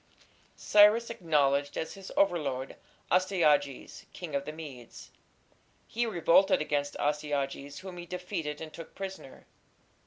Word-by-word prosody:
Cyrus 210 +3 +5
acknowledged 145 -8 +1
as 160 - -3
his 195 -1 -10
overlord 140 -9 0 0.4
Astyages, 155 -7 +1
king 170 -5 -7
of 140 0 -1
the 150 - -4
Medes. 145 -7 -10 0.7
He 235 +1 -1
revolted 190 -1 +4
against 145 -1 -1
Astyages, 145 0 -2
whom 185 -2 -8
he 175 0 -8
defeated 175 -4 -4
and 155 -1 -8
took 165 - -10
prisoner. 190 -8 -8
160 Hz, 120 wpm, -30 LUFS, 145-185 Hz, 0.7 s, Cyrus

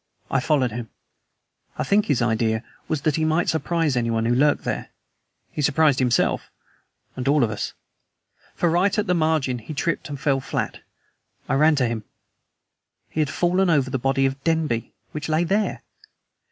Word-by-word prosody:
I 135 - +3
followed 130 -3 +1
him. 115 0 -6 0.9
I - - 0
think 210 +1 +2
his 125 -3 +2
idea 110 0 +1 0.2
was 155 -3 -1
that 155 -1 +1
he 160 - 0
might 160 +2 +1
surprise 160 -2 0
anyone 115 -2 0
who 120 - +2
lurked 145 +4 +3
there. - - -3 0.6
He - - -3
surprised 150 -1 +3
himself, 125 -2 +1 0.7
and 130 0 -4
all 145 -1 +4
of 110 - +1
us. 105 - -4 0.8
For 175 - +1
right 185 +5 +2
at 210 - +1
the 180 - +1
margin 155 -7 +1
he 115 +7 -8
tripped 165 +1 -2
and 145 -1 -5
fell 140 -1 +1
flat. 135 - -3 0.7
I - - 0
ran 155 +3 +4
to 135 -3 +2
him. 115 -2 -3 1.1
He - - -4
had 150 -2 +2
fallen 180 +5 +2
over 140 -5 +2
the 130 - -1
body 135 +2 +1
of 135 0 -2
Denby, 160 -8 0 0.2
which 150 0 -5
lay 155 +2 +2
there! 200 +5 0
145 Hz, 175 wpm, -23 LUFS, 125-160 Hz, 1.1 s, all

